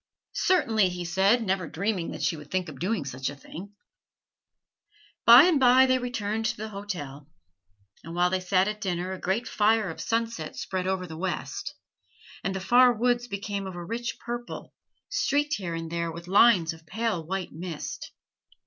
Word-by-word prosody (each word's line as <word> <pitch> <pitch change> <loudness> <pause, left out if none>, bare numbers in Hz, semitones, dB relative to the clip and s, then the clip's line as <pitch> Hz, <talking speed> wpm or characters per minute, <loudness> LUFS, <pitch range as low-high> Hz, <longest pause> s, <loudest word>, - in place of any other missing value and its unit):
"Certainly," 225 - +2
he 180 0 -5
said, 195 +7 +3
never 190 -4 -1
dreaming 185 +1 -2
that - - -6
she - - +1
would 150 -2 -11
think 185 -2 -1
of 140 -4 -11
doing 185 -3 -1
such 130 0 -3
a 145 - -8
thing. 195 +8 -10 1.5
By 235 +2 +11
and 335 -4 +4
by 255 0 +6
they 255 0 +2
returned 225 -3 -3
to 220 - -2
the 220 +1 -5
hotel; 175 -9 -6 0.8
and 165 +1 -8
while 180 +1 +2
they 185 - +1
sat 185 +1 +2
at 210 0 -4
dinner 180 -1 -2
a 190 - -7
great 200 +6 -1
fire 215 -2 +2
of - - -8
sunset 225 -8 -2
spread 185 -1 -3
over 190 -1 -1
the 160 -2 -9
west; 190 - -4 0.7
and 195 - -2
the - - -2
far 245 +6 +5
woods 245 +1 0
became 200 -2 -4
of 185 - -7
a 175 -1 -6
rich 235 +4 -4
purple, 240 0 -7 0.3
streaked 290 - 0
here 175 -4 -4
and 165 0 -5
there 170 0 -2
with 170 +1 -9
lines 185 -4 +5
of 160 0 -16
pale 220 -2 -2
white 190 +3 -4
mist. 165 -1 -6
195 Hz, 180 wpm, -27 LUFS, 175-230 Hz, 1.5 s, By